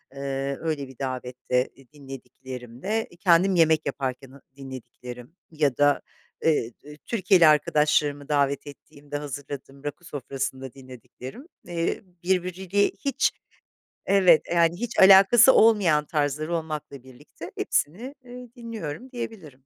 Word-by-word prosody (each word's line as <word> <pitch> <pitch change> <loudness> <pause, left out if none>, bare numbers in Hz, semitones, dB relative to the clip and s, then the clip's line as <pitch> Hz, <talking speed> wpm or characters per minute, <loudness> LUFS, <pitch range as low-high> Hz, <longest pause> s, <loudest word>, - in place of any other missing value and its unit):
ııı, 140 0 -3
öyle 155 -4 -2
bir 130 - -15
davette, 125 -1 -2
iii, 135 -1 -20
dinlediklerimde, 135 - -6
kendim 185 +1 +4
yemek 160 -2 +3
yaparken, 135 -1 -4
ha 140 - -16
dinlediklerim 125 0 -10 0.2
ya 150 -5 0
da, 145 0 +3 0.4
eee, 150 -7 +2
d 150 +1 -12
Türkiyeli 185 -2 +3
arkadaşlarımı 150 -1 +2
davet 140 -1 +1
ettiğimde 145 0 -9
hazırladığım 140 -1 -8
rakı 145 +4 -6
sofrasında 135 -2 -5
dinlediklerim, 130 - -11 0.2
eee, 170 -1 -2 0.2
birbiriyle 185 +2 +1 0.2
hiç 275 -2 +2 0.8
evet, 185 -5 +5
eee, - - -2
yani, 170 0 +3 0.2
alakası 195 +7 +8
olmayan 195 -9 +4
tarzlar 150 0 -1
olmakla 155 -5 -4
birlikte 130 -1 -12
hepsini, 230 - -2
eee, 250 0 -10
dinliyorum 230 - -7
diyebilirim. 220 - -7
150 Hz, 115 wpm, -25 LUFS, 135-180 Hz, 0.8 s, alakası